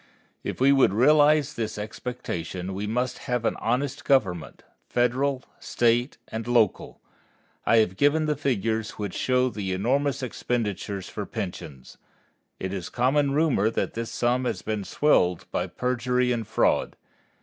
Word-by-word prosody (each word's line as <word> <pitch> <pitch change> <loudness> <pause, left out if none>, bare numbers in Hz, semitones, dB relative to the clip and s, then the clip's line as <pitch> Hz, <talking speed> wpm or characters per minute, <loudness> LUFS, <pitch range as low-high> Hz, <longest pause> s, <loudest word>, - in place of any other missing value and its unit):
If - - -4
we 135 +2 +5
would 135 -8 +4
realize 150 +3 +4
this 110 -2 -4
expectation 95 -5 -5
we 100 +2 -3
must 125 +3 -1
have 125 -2 0
an - - +1
honest 135 +5 -1
government, 95 - 0 0.3
Federal, 130 +2 +1 0.2
State, 120 +3 +1
and 110 +1 -5
local. 115 -5 +1 0.7
I 115 - +5
have 95 -4 +2
given 150 +2 +3
the 150 -1 +1
figures 115 -5 -1
which 100 -3 -4
show 130 0 +1
the 100 -5 -3
enormous 135 +7 0
expenditures 105 -5 -3
for 105 -3 -6
pensions. 80 - -7 0.6
It 95 0 -4
is 95 -3 -5
common 140 +3 +2
rumor 145 -9 +3
that 115 - -2
this 115 0 -4
sum 125 +1 0
has - - -2
been 105 -2 -3
swelled 90 - +2
by - - -1
perjury 125 0 0
and 115 -3 -2
fraud. 110 - +1
120 Hz, 145 wpm, -26 LUFS, 105-130 Hz, 0.7 s, we